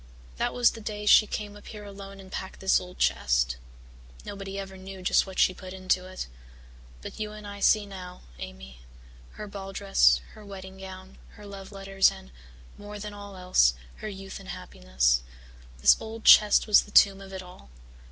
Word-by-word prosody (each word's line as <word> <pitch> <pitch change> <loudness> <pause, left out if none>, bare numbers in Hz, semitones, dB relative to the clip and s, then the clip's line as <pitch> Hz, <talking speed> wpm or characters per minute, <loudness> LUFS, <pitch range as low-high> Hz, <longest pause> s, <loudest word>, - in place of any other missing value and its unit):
That - - 0
was 245 -1 +4
the 225 - -10
day 210 0 -5
she 215 0 +7
came 205 -1 -5
up 205 - -14
here 210 -1 -9
alone 195 -1 -10
and 190 -1 -13
packed 190 - -6
this 190 0 +3
old 180 0 -11
chest. - - +1 0.7
Nobody 195 -1 -6
ever 195 -1 -6
knew 190 0 -10
just 180 - +3
what 190 - -9
she 185 - +4
put 185 0 -10
into 185 0 0
it. 185 0 -6 0.8
But - - -8
you 210 0 -4
and 210 -1 -10
I 200 0 -8
see 210 +1 +4
now, 185 -2 -9 0.2
Amy 60 0 -9 0.5
her - - -7
ball 195 -1 -8
dress, 125 - +4
her 215 - -13
wedding 190 -1 -10
gown, 190 0 -10
her 210 - -13
love 195 -1 -9
letters 195 -1 +2
and, 65 - -12 0.5
more 205 0 -8
than 210 0 -7
all 205 -1 -10
else, 180 - +3 0.2
her 215 - -6
youth 195 -1 -8
and 195 -1 -12
happiness - - 0 0.6
this - - +7
old 220 0 -8
chest 210 -1 +7
was 210 -2 +6
the - - -13
tomb 195 -1 +5
of 195 0 -11
it 190 -1 -6
all. 180 - -15
195 Hz, 190 wpm, -27 LUFS, 185-205 Hz, 0.8 s, she